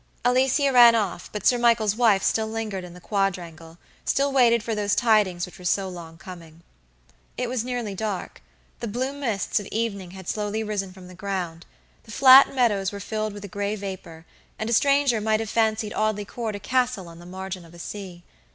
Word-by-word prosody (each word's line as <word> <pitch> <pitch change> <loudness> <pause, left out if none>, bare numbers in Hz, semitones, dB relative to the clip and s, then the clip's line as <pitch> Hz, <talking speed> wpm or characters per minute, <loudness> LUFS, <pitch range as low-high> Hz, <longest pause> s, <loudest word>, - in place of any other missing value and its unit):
Alicia 265 +3 +3
ran 240 -2 +8
off, 200 -6 -2
but 210 - -6
Sir 245 - +4
Michael's 230 -3 +3
wife 220 -5 +3
still 220 -1 +1
lingered 220 -4 -4
in 175 -1 -10
the - - -11
quadrangle, 175 -4 -3 0.3
still 280 +1 +1
waited 235 -4 +4
for 230 - -2
those 205 -1 0
tidings 210 -7 +2
which 180 - -14
were - - -12
so 190 +2 0
long 170 -3 -9
coming. 170 -2 -12 0.7
It 250 - -1
was 245 -2 -2
nearly 245 -4 -3
dark. 205 -1 -4 0.4
The 235 - -4
blue 255 +6 -2
mists 235 -11 -1
of 205 - -8
evening 205 -5 -3
had 190 0 -11
slowly 210 +1 -2
risen 205 -3 -3
from 185 -1 -13
the 180 - -12
ground. 180 -3 -5 0.4
The 220 - -12
flat 265 +3 +8
meadows 205 -6 +2
were 200 - -7
filled 215 +1 -3
with 205 0 -8
a - - -6
gray 205 +1 -3
vapor, 185 -5 -8 0.3
and 220 +1 -3
a - - +2
stranger 275 -2 +3
might 215 0 +1
have 225 -2 -4
fancied 220 -1 +1
Audley 215 -1 -1
Court 220 0 -4
a - - -6
castle 250 -6 0
on 165 0 -12
the 175 - -12
margin 190 0 -6
of 165 0 -16
a - - -12
sea. 180 -1 -8
210 Hz, 200 wpm, -24 LUFS, 185-230 Hz, 0.7 s, ran